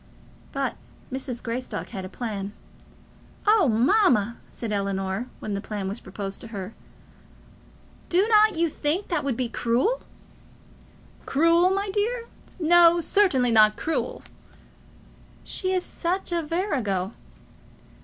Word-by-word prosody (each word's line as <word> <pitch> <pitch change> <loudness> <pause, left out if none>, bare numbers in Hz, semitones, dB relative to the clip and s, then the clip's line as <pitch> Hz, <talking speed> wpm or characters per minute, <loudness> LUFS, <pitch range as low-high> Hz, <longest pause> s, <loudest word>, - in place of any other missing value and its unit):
But - - -2 0.4
Mrs. 260 -2 -4
Greystock 245 +2 -4
had 190 -4 -6
a - - -7
plan. 205 -3 -5 0.9
"Oh, 425 -5 +5
mamma," 235 - +3
said 230 -3 -6
Ellinor, 195 +2 -2
when 210 - -4
the 200 - -2
plan 205 -2 -4
was 200 +4 -3
proposed 195 +1 -6
to - - -8
her, 205 -2 -6 1.4
"do 370 +4 +3
not 430 -1 +5
you 335 +1 +2
think 315 +5 -2
that 335 -4 0
would 270 -5 -1
be 255 -2 0
cruel?" 245 - 0 1.3
"Cruel, 335 +5 +4
my 395 +1 -1
dear! 455 +4 0 0.4
no; 345 0 +6
certainly 315 -10 +3
not 215 -1 +5
cruel." 320 - -2 1.2
"She 370 -1 -2
is 370 -1 0
such 360 +2 -2
a 340 -1 +1
virago." 260 - -1
265 Hz, 125 wpm, -25 LUFS, -, 1.4 s, no